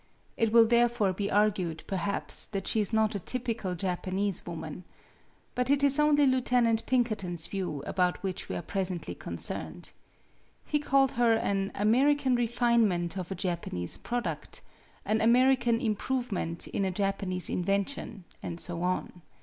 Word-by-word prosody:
It 225 -1 +1
will 230 0 +7
therefore 235 -4 +2
be 200 +2 -2
argued, 195 -6 +1
perhaps, 195 0 -1
that 195 -2 -4
she 220 - +1
is 205 - -2
not 220 -1 +2
a 200 - -2
typical 230 -3 -3
Japanese 190 +2 -2
woman. 160 0 -6 0.7
But 250 +1 -1
it 280 0 +3
is 280 +1 +4
only 295 -1 +4
Lieutenant 245 -3 +2
Pinkerton's 210 -10 0
views 180 -8 -4
about 180 0 0
which 190 -2 -4
we 90 - -3
are 90 - -4
presently 185 -3 -3
concerned. - - -4 0.7
He 300 - 0
called 275 -2 +3
her 235 -1 +3
an 195 -3 -1
American 260 +6 +3
refinement 230 -7 +1
of 185 -1 -5
a - - -2
Japanese 170 - -3
product, 240 0 -4 0.4
an 220 +1 +1
American 240 0 +4
improve 245 +2 -2
ment 165 -3 -2
in 200 - -1
a 190 - +1
Japanese 195 -1 0
invention, 200 +2 -2 0.2
and 170 0 -5
so 170 -1 -4
on. 180 0 -2
205 Hz, 150 wpm, -29 LUFS, 185-240 Hz, 0.7 s, will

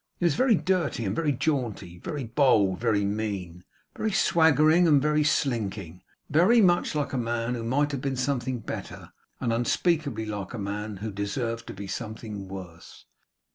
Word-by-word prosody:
He 175 - -1
was 170 - +4
very 255 - +4
dirty 175 - 0
and 95 +1 -1
very 155 -3 +1
jaunty; 120 - -2
very 150 - -4
bold 115 -4 +3
and 95 - -5
very 110 -4 +1
mean; 100 -4 -3 0.3
very 220 - -1
swaggering 160 -2 +4
and 150 -3 +5
very 150 +1 +2
slinking; 105 - -1 0.3
very 180 - +4
much 175 -6 +3
like 145 -2 -1
a 130 - 0
man 120 0 -1
who 120 -2 -4
might 145 +5 +1
have 140 -3 -3
been 135 -1 -2
something 130 -1 -1
better, - - -7 0.3
and 115 -2 0
unspeakably 125 0 0
like 105 0 -5
a - - -5
man 105 0 -4
who 110 - -3
deserved 115 +4 -3
to - - -7
be 100 +1 -7
something 105 -1 -6
worse. 90 -3 -10
120 Hz, 175 wpm, -27 LUFS, 105-150 Hz, 0.3 s, and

